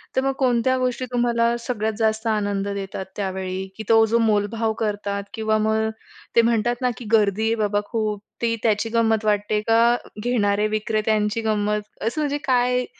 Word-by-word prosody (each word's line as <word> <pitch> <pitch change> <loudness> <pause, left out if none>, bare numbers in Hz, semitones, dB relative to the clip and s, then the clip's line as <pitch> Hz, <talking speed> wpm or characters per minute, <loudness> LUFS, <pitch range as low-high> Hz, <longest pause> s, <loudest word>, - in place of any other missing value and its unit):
तर 260 - +3
मग 270 - +1
कोणत्या 255 0 +2
गोष्टी 255 0 -1
तुम्हाला 235 -1 +2
सगळ्यात 220 -3 -2
जास्त 220 0 +1
आनंद 205 -2 0
देतात 195 -1 -4
त्यावेळी, 190 -1 -3
की 220 - -5
तो 225 0 +6
जो 225 +1 +1
मोलभाव 220 0 +1
करतात 205 -1 -2
किंवा 220 -1 0
मग 220 0 +1 0.5
ते 235 - +7
म्हणतात 230 +1 +1
ना, 250 - +2
की 245 - -9
गर्दी 215 -1 +3
आहे 225 - +2
बाबा 205 -2 0
खूप. 215 -2 -2 0.2
ती 230 -1 +1
त्याची 220 0 +1
गंमत 225 -2 +2
वाटते? 210 0 +1
का 230 +1 +5 0.3
घेणारे 210 -3 +1
विक्रेत्यांची 215 0 0
गंमत 210 -1 0 0.2
असं, 235 +8 -1
म्हणजे 290 -1 0
काय 250 -1 +2
220 Hz, 165 wpm, -23 LUFS, 210-235 Hz, 0.5 s, ते